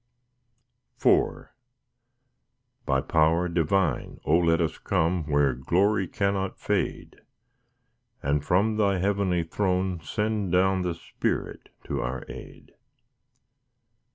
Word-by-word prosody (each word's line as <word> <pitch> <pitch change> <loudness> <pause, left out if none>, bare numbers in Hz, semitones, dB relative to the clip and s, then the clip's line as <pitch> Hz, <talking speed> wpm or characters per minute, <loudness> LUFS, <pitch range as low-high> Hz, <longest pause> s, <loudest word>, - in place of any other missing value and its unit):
IV - - +2 1.4
By 65 0 +2
power 80 +4 +2
divine, 85 -2 0
O 75 - +3
let 85 -1 +2
us 80 -2 -1
come 85 -2 0
Where 70 -3 +2
glory 95 - +1
cannot 100 +1 -1
fade; - - -2 1.0
And 70 0 0
from 105 +7 +2
Thy 100 -3 +2
heavenly 95 -2 +1
throne 95 0 -1
send 105 +3 -2
down 95 +1 +3
The 90 -2 -2
Spirit - - -4
to - - -3
our 60 +1 -4
aid. - - -11
90 Hz, 100 wpm, -26 LUFS, 80-95 Hz, 1.4 s, O